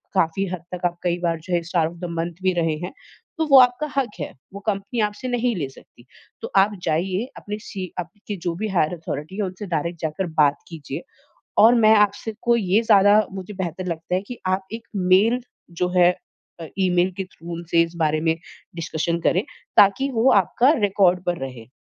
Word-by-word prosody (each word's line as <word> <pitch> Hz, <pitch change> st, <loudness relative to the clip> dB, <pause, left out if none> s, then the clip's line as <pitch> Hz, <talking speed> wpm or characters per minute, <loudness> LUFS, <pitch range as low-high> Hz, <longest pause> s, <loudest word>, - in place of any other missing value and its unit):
काफ़ी 185 Hz, +2 st, +1 dB
हद 180 Hz, -2 st, -5 dB
तक 180 Hz, 0 st, -5 dB
आप 175 Hz, 0 st, 0 dB
कई 175 Hz, -1 st, +1 dB
बार 170 Hz, -2 st, -1 dB
जो 180 Hz, -, -5 dB
है 175 Hz, -, +2 dB
स्टार 170 Hz, -3 st, +1 dB
ऑफ़ 175 Hz, +2 st, -7 dB
मंथ 170 Hz, +1 st, -3 dB
भी 185 Hz, 0 st, +3 dB
रहे 165 Hz, -3 st, 0 dB
हैं। -, -, -7 dB, 0.5 s
तो 320 Hz, -, +1 dB
वो 270 Hz, -, +10 dB
आपका 250 Hz, +4 st, +4 dB
हक 265 Hz, -5 st, +2 dB
है, 145 Hz, -, -4 dB, 0.2 s
वो 200 Hz, -, -7 dB
कंपनी 200 Hz, +3 st, -2 dB
आपसे 210 Hz, +4 st, -2 dB
नहीं 245 Hz, -1 st, 0 dB
ले 145 Hz, -5 st, -2 dB
सकती। 120 Hz, -2 st, -18 dB, 0.4 s
तो -, -, -6 dB
आप 200 Hz, +2 st, +5 dB
जाइए 185 Hz, +7 st, 0 dB
अपने 210 Hz, 0 st, -5 dB
सी 185 Hz, -3 st, -7 dB
आपके 205 Hz, +3 st, -6 dB
जो 170 Hz, 0 st, -3 dB
भी 215 Hz, +5 st, -3 dB
हायर 175 Hz, -3 st, +1 dB
अथॉरिटी 165 Hz, +1 st, -6 dB
है -, -, -1 dB
उनसे 185 Hz, +2 st, -5 dB
डायरेक्ट 170 Hz, 0 st, -2 dB
जाकर 160 Hz, +4 st, -2 dB
बात 145 Hz, -1 st, +5 dB
कीजिए 150 Hz, -5 st, -6 dB, 0.6 s
और 235 Hz, +2 st, +8 dB
मैं 220 Hz, -2 st, +6 dB
आपसे 210 Hz, +2 st, +1 dB
को 235 Hz, -1 st, +3 dB
ये 200 Hz, -1 st, +2 dB
ज़्यादा 210 Hz, -1 st, +5 dB
मुझे 190 Hz, +1 st, -7 dB
बेहतर 185 Hz, -1 st, -4 dB
लगता 165 Hz, +1 st, -3 dB
है 185 Hz, -, +2 dB
कि 245 Hz, -, -7 dB
आप 190 Hz, +1 st, 0 dB
एक 230 Hz, +1 st, -7 dB, 0.2 s
मेल 225 Hz, +6 st, +5 dB, 0.4 s
जो 180 Hz, -, +3 dB
है 175 Hz, 0 st, +6 dB, 0.5 s
अ, 165 Hz, -, -6 dB
ईमेल 180 Hz, -1 st, +2 dB
के 190 Hz, -, -1 dB
थ्रू 170 Hz, -1 st, -8 dB
से 165 Hz, -, +5 dB
इस 170 Hz, +1 st, -4 dB
बारे 155 Hz, -1 st, +1 dB
में 160 Hz, 0 st, +2 dB, 0.4 s
डिस्कशन 170 Hz, 0 st, -2 dB
करें, 180 Hz, +3 st, +2 dB, 0.3 s
ताकि 265 Hz, +8 st, +5 dB
वो 240 Hz, +2 st, +3 dB
आपका 235 Hz, -, +4 dB
रिकॉर्ड 190 Hz, -3 st, +3 dB
पर 175 Hz, -1 st, -1 dB
रहे 125 Hz, -4 st, -7 dB
185 Hz, 200 wpm, -22 LUFS, 170-210 Hz, 0.6 s, वो